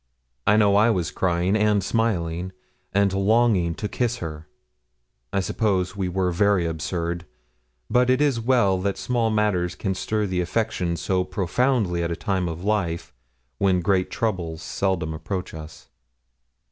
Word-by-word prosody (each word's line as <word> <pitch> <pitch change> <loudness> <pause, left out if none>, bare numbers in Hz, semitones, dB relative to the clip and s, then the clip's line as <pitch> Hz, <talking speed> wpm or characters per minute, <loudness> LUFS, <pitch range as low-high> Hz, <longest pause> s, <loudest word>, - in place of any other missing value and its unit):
I 105 - +5
know 100 -2 +4
I 110 +3 +5
was 90 -8 0
crying 90 +2 +1
and 105 -2 +2
smiling, 95 -5 -1 0.4
and 100 0 +2
longing 100 -4 +2
to 105 - -3
kiss 120 +2 -1
her. 80 -4 -7 0.8
I 95 - +1
suppose 95 -2 0
we 95 -2 -2
were 90 0 0
very 100 0 +2
absurd; 85 +1 -3 0.6
but 125 0 +3
it 130 - +3
is 145 -5 +2
well 115 -6 +3
that 100 0 -1
small 120 -2 0
matters 100 -5 +1
can 95 - -2
stir 105 +3 -1
the 90 -2 -1
affections 90 -3 -1
so 95 -1 +1
profoundly 95 +1 0
at 85 - -1
a 85 - -2
time 95 -1 -1
of 80 +2 -6
life 95 -5 -1 0.5
when 95 -2 +3
great 95 +1 +1
troubles 85 -8 -2
seldom 95 -5 -1
approach 90 +4 -4
us. 80 0 -10
95 Hz, 150 wpm, -24 LUFS, 85-105 Hz, 0.8 s, I